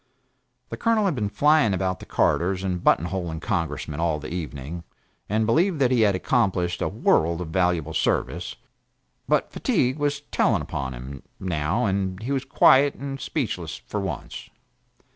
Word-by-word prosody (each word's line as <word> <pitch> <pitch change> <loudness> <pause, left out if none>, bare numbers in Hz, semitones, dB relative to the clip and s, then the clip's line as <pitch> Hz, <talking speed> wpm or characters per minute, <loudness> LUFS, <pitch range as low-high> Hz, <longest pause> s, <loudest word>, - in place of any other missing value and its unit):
The - - -5
Colonel 225 -2 +2
had 190 - +2
been 105 -6 -2
flying 150 -4 +3
about 95 0 -1
the - - -11
corridors 90 +2 +1
and 90 -2 -2
button 85 - +4
holing 85 -3 -3
Congressmen 80 - -3
all 80 -2 +1
the 75 +2 -7
evening, 80 -1 -5 0.5
and 110 +2 +1
believed 165 - +2
that 130 -3 +2
he 125 -3 +3
had 100 -3 +4
accomplished 95 -5 0
a - - +1
world 85 +1 +2
of 90 -3 -5
valuable 85 -2 0
service; - - -1 0.7
but - - +1
fatigue 130 +4 0
was 145 0 0
telling - - +2
upon 65 -2 -4
him, 65 +3 -8 0.2
now, 80 -3 -1
and 95 -2 -1
he 130 - -3
was 135 -1 -1
quiet 135 +1 +5
and 135 0 -6
speechless - - -3
for - - -3
once. - - -6
95 Hz, 160 wpm, -24 LUFS, 85-130 Hz, 0.7 s, quiet